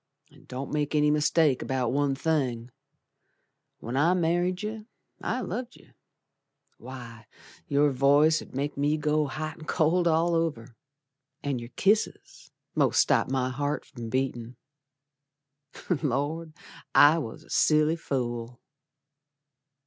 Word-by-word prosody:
An' - - -19
don't 130 +2 -6
make 150 0 -1
any 150 0 +4
mistake 150 -2 +2
about 130 -3 -1
one 140 0 +1
thing, 130 -6 -1 1.1
When 120 +3 -6
I 165 +6 +3
married 175 +3 0
yer 215 0 -5 0.3
I 255 - -2
loved 245 +4 -5
yer. - - -20 0.9
Why, 120 -3 -10 0.4
your 145 +1 +3
voice 145 +4 +4
'ud - - -13
make 145 +2 -2
Me 145 +2 +1
go 150 0 +1
hot 155 +3 -5
and 155 - -11
cold 170 +2 +2
all 165 +1 +2
over, 150 -9 -2 0.7
An' 140 -3 -1
your 120 0 -9
kisses 210 +2 0 0.2
most - - +2
stopped - - +3
my 130 -1 0
heart 145 +3 -2
from 120 -4 -8
beatin'. 125 -2 -2 1.5
Lord! 155 +3 -2 0.4
I 150 +3 +7
was 115 -8 -7
a - - -17
silly 155 +1 +3
fool. 120 -6 -4
145 Hz, 125 wpm, -27 LUFS, 130-160 Hz, 1.5 s, I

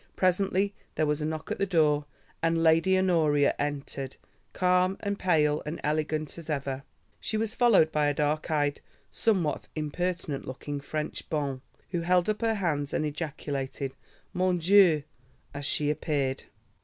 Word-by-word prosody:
Presently 190 +2 +2 0.2
there 155 - +2
was 150 0 0
a - - -1
knock 155 0 -4
at - - -2
the 200 - +1
door 150 -5 +3 0.4
and 165 0 +2
Lady 165 +4 +4
Honoria 160 -6 +3
entered, 140 -2 -3 0.3
calm 180 +1 +2
and 200 -1 -2
pale 150 -4 +2
and 155 +3 -5
elegant 155 +1 -1
as 165 -1 -11
ever. 140 -2 -2 0.4
She 220 - -2
was 220 0 -1
followed 225 -11 +4
by 150 -1 +2
a 145 - +2
dark 150 +1 0
eyed 145 -2 0 0.3
somewhat 185 -9 0
impertinent 155 -1 -2
looking 140 +2 -5
French 150 +2 -4
bonne, 140 -4 -2 0.3
who 175 -2 -1
held 180 +3 +3
up 210 - -5
her 225 -1 +2
hands 150 -8 -1
and 155 - 0
ejaculated, 145 -3 -4 0.4
"Mon 185 0 +2
Dieu!" 175 -3 +5 0.5
as 140 0 -3
she 150 0 +2
appeared. 145 -3 -1
155 Hz, 155 wpm, -28 LUFS, 145-180 Hz, 0.5 s, Dieu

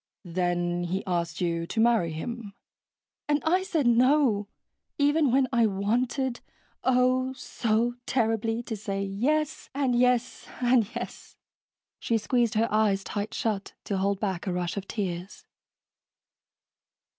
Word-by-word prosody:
"Then 175 0 -1
he 185 +3 -2
asked 170 -3 -2
you 170 -1 -1
to 225 - -3
marry 225 -7 +3
him." 205 +5 -6 0.7
"And 295 0 +3
I 360 +4 +3
said 335 -7 0
no, 240 -3 +4 0.5
even 290 0 +3
when 265 +1 +3
I 235 -2 +4
wanted, 240 +6 0 0.4
oh, 255 0 +2
so 235 -2 0
terribly, 225 -1 0
to 230 - -4
say 200 -1 -3
yes 285 +11 -1
and 270 -3 +1
yes 250 0 +1
and 245 -3 +3
yes." - - -7 0.6
She 230 - +1
squeezed 235 0 +1
her 225 +2 +3
eyes 205 -2 +2
tight 205 +1 -4
shut 210 -3 -2
to 200 - -2
hold 195 0 0
back 195 -2 -2
a - - 0
rush 180 0 -2
of 200 -1 -5
tears. 185 -2 -4
225 Hz, 135 wpm, -27 LUFS, 195-250 Hz, 0.7 s, no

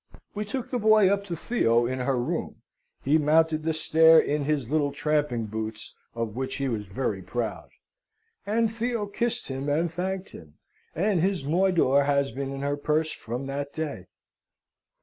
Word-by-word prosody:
We 210 0 -3
took 255 +3 -5
the 250 - 0
boy 215 -3 +5
up 200 0 -2
to 175 -4 -4
Theo 120 - +2
in 130 +2 -2
her 125 +1 0
room 155 +8 -3 0.4
(he 150 +4 +3
mounted 155 +1 +3
the 160 +1 0
stair 160 +1 +5
in 145 -2 +2
his 145 -5 0
little 145 +1 +1
tramping 150 -8 0
boots, 110 +1 -6 0.2
of 115 -2 -3
which 130 +1 -3
he 140 -1 -2
was 110 -5 -3
very 100 -1 -2
proud); 115 +2 -4 0.7
and 220 +2 0
Theo 230 -1 -2
kissed 230 0 -2
him, 135 +2 -3
and 160 +3 0
thanked 190 +2 -3
him; 75 -3 -13 0.4
and 190 +2 +1
his 185 -5 0
moidore 160 -4 +3
has 140 -1 +1
been 135 0 -4
in 135 0 -5
her 145 +1 -1
purse 155 +2 0
from 120 +4 -5
that 140 +1 -4
day. 150 - -5
150 Hz, 170 wpm, -26 LUFS, 130-180 Hz, 0.7 s, boy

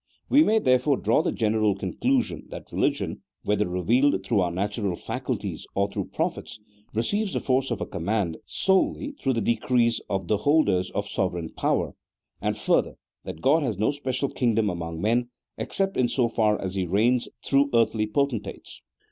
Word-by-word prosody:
We 285 - +6
may 220 -8 +4
therefore 130 - +3
draw 110 +3 +2
the - - 0
general 110 -2 +1
conclu 255 - +1
sion - - -8
that - - -9
religion, - - -1 0.2
whether 105 -1 +1
revealed 95 +4 +2
through 110 -2 +2
our 90 - +1
natural 100 +1 -2
faculties - - -4
or 100 +1 +1
through - - -3
prophets, - - -3 0.3
receives 200 - -1
the - - 0
force 130 0 +1
of 120 - -3
a - - -1
com 80 - -6
mand 100 -6 0
solely 190 +9 +1
through 135 - +1
the 115 - 0
decrees 115 +1 +1
of 95 -3 -2
the 105 - +2
holders 105 - +2
of 100 0 -3
sovereign 90 -5 -2
power; - - -1 0.5
and, - - -1
further, - - +1 0.3
that 80 - -7
God 155 +5 +4
has 120 -9 -1
no 110 +6 +2
special 140 -1 -2
kingdom 115 -4 +1
among 85 -2 -5
men, 120 +3 +1 0.3
except 195 0 -1
in 125 - +3
so 120 -1 +1
far 110 -2 +1
as 95 -1 -4
He 95 -2 -1
reigns 115 +7 +2 0.2
through 140 +1 +3
earthly 110 -2 +2
potentates. 115 -3 -3
115 Hz, 175 wpm, -25 LUFS, 100-130 Hz, 0.5 s, We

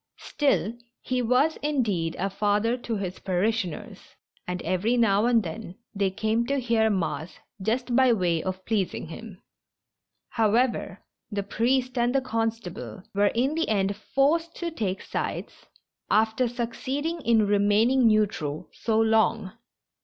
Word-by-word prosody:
Still, 275 -6 0 0.3
he 255 -1 -1
was, 255 +7 +2
indeed, 220 - -1
a 195 +1 -1
father 210 +4 +1
to 240 -2 -4
his 185 -2 -4
parishioners, 190 -1 -2 0.3
and 180 0 -3
every 185 +8 +1
now 220 -1 +3
and 235 -3 +3
then 180 +2 -7 0.2
they 200 -2 +1
came 220 +4 0
to 280 +1 0
hear 230 -3 +2
mass 180 -4 -2 0.2
just 240 +4 -1
by 260 -1 +5
way 175 -7 +1
of 185 +1 -5
pleasing 200 -7 -1
him. 200 +2 -10 0.9
However, 225 -3 +1 0.3
the 200 -1 -2
priest 250 +4 0
and 240 +2 +1
the 270 - +3
constable 225 -6 -3
were 205 +1 +3
in 260 +5 +1
the 325 +1 -1
end 200 -2 +1
forced 325 +9 +1
to 345 -1 -4
take 200 -11 -3
sides - - -5 0.4
after 220 +3 +2
succeeding 265 +7 -3
in 230 -4 +3
remaining 210 +5 +3
neu 215 -1 +5
tral 155 -7 -6
so 220 -1 0
long. 220 -2 +2
225 Hz, 140 wpm, -26 LUFS, 195-245 Hz, 0.9 s, by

